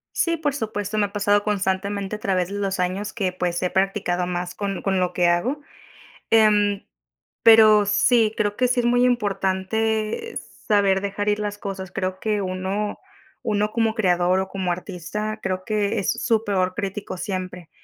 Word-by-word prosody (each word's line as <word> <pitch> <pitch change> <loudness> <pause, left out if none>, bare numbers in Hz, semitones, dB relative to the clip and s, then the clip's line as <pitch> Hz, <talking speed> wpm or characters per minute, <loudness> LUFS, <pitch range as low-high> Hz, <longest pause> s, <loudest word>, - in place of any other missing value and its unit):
Sí, 335 -1 +1
por 295 -3 -1
supuesto 215 -4 -3
me 205 - +3
ha 200 - -15
pasado 205 0 +2
constantemente 200 0 -1
a - - -14
través 185 -3 0
de 200 - -5
los 195 -2 -2
años 190 +3 -2
que 195 -5 -1
pues 180 -1 -2
he 180 - 0
practicado 190 -2 0
más 175 0 -3
con 200 -2 -4
con 190 -1 0
lo 180 -1 0
que 175 -1 +2
hago. 240 +13 0 0.7
Em, 210 -2 +4 0.6
pero 215 -2 +7
sí, 220 +1 +3
creo 205 -1 0
que 250 +3 +2
sí 250 0 +1
es 240 - 0
muy 245 +1 +3
importante 220 - -1 0.3
saber 200 -3 +3
dejar 200 +1 -2
ir 210 0 +1
las 205 -1 -3
cosas. 190 -2 -6
Creo 185 0 -3
que 210 -1 -1
uno 190 +2 -3 0.4
uno 210 0 0
como 225 -1 +1
creador 180 -4 +2
o 190 - -2
como 190 -2 -2
artista 200 +4 -4
creo 185 -1 -2
que 210 0 0
e - - +2
es 190 - 0
su 225 -2 +2
peor 185 -3 0
crítico 200 -2 -4
siempre. 185 -3 -5
200 Hz, 180 wpm, -23 LUFS, 185-215 Hz, 0.7 s, pero